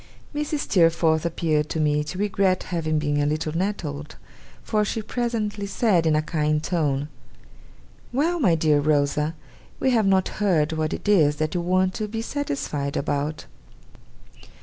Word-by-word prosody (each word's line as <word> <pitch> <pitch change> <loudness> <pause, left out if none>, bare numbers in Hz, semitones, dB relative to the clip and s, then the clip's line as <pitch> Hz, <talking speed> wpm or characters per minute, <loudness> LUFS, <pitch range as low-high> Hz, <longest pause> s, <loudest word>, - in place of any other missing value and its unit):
Mrs. 295 0 -2
Steerforth 165 - +3
appeared 155 -3 0
to 160 - -2
me 150 -1 +2
to 180 - -6
regret 195 -2 +1
having 155 -2 0
been 145 -1 0
a - - +1
little 155 +1 -2
nettled; 165 -6 -3 0.5
for 215 -1 +1
she 215 +1 -2
presently 215 -3 -2
said, 195 -5 +2
in 155 - +3
a 155 - +1
kind 150 -1 0
tone: 145 -5 0 1.0
'Well, 320 +7 +1
my 185 - +4
dear 155 -2 +3
Rosa, 150 +1 +1 0.4
we 265 - +2
have 225 -5 +3
not 190 -1 +3
heard 165 -6 +2
what 155 -1 -1
it - - -5
is 155 -8 +4
that 155 +1 -2
you 175 - 0
want 185 +1 +1
to 215 - -3
be 225 +2 -4
satisfied 145 - -3
about? 145 +1 -2
165 Hz, 155 wpm, -24 LUFS, 150-205 Hz, 1.0 s, my